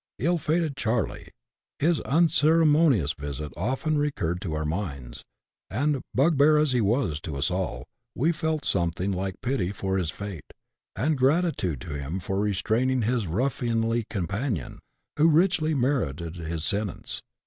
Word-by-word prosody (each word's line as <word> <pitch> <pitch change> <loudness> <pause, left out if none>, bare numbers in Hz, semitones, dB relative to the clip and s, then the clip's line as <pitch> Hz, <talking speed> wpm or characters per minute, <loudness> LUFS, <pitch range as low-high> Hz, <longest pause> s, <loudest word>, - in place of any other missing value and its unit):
Ill 170 - +1
fated 155 -1 0
Charley! 115 -5 -2 0.2
— - - -67
his 165 +2 +2
unceremonious 155 - +4
visit 70 +1 -6
often 135 - 0
recurred 90 - -1
to 80 -5 -3
our 75 0 -2
minds, 75 -8 -4 0.5
and, 140 +5 0
bugbear 150 +2 +5
as 150 -2 +3
he 125 -2 +2
was 100 - +1
to 75 -3 -5
us 70 +6 0
all, 90 0 -2 0.3
we 155 +8 +2
felt 160 -2 -2
something 90 +2 0
like 95 0 -3
pity 120 -8 0
for 95 -1 -1
his 85 -4 -1
fate, 100 -3 -7 0.4
and 150 0 0
gratitude 135 - +1
to - - -6
him 75 +7 -4
for 95 +2 -2
restraining 115 +5 +1
his 115 -2 0
ruffianly 115 - 0
companion, 100 - -3 0.4
who 155 +2 +5
richly 160 -1 +3
merited 115 - -1
his 80 -1 -4
sentence. 100 -2 -2
115 Hz, 145 wpm, -26 LUFS, 90-145 Hz, 0.5 s, bugbear